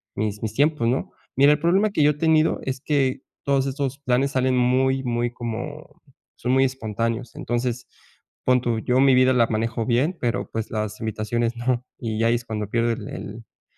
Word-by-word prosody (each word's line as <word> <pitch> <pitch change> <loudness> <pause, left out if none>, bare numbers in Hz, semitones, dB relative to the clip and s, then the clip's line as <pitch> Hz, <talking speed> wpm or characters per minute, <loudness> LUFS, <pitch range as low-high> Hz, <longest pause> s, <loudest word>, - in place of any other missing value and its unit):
mis 105 0 -2
mis 110 -1 -3
tiempos, 145 0 +2
¿no? 130 - -1 0.3
Mira, 140 +2 +6
el 150 - -1
problema 190 +6 +2
que 155 - +2
yo 150 - +5
he - - -3
tenido, 160 0 +3
es 130 -1 -4
que, 135 -3 0 0.2
todos 140 -1 +2
estos 135 0 -3
planes 135 0 +1
salen 130 -1 +1
muy, 130 +2 +2
muy 120 -1 -1
como 120 -2 -7 0.3
son 125 - -2
muy 135 +1 +4
espontáneos. 115 -1 -3
Entonces, 120 0 -2 0.6
pon 125 -1 +4
tú, 120 -2 0
yo 125 +3 +1
mi 135 -1 +5
vida 130 0 +5
la 120 -2 +4
manejo 115 +1 -1
bien, 130 +9 +1
pero 115 -5 -1
pues 115 -1 -3
las 110 -1 -3
invitaciones 110 +2 -2
no. 120 0 0 0.2
Y 110 -2 -3
ahí 115 +1 +3
es 120 - -4
cuando 105 -2 -4
pierdo 115 +1 +1
el 115 -2 -5
el 110 +2 -9
125 Hz, 190 wpm, -23 LUFS, 115-135 Hz, 0.6 s, Mira